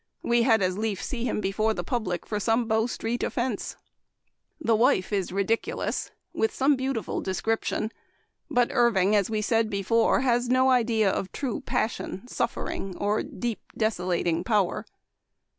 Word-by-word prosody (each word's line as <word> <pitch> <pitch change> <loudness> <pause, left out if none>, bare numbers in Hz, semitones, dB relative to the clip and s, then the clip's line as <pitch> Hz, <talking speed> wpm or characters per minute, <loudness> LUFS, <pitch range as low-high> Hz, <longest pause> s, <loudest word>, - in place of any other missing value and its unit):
We 235 0 +3
had 225 -4 +4
as 185 +2 0
lief 215 -3 -1
see 245 -3 -3
him 220 -3 -1
before 215 +3 0
the - - -3
public 215 - -2
for 210 - -2
some 225 +3 +1
Bow 220 +1 +2
street 235 0 -3
offense. 240 -4 -2 0.4
" - - -50
The 225 - +6
Wife 215 -4 +2
is 195 -3 0
ridiculous, 200 +4 -1 0.2
with 445 - +1
some 280 +2 +3
beau 265 +1 -1
tiful 225 - -3
description; 220 +3 -1 0.6
but 245 -1 +2
Irving, 215 -5 +3
as 200 -1 +2
we 215 -1 -1
said 225 0 +2
before, 225 +4 +2
has 245 -2 +1
no 260 +1 +4
idea 225 -5 +3
of 190 - -3
true 260 -6 -3
passion, 225 0 -2
suffering, 195 -5 -3
or 205 +1 +1
deep, 235 -3 -4 0.2
desolating 180 -5 0
power. 200 -3 0
220 Hz, 160 wpm, -26 LUFS, 200-240 Hz, 0.6 s, The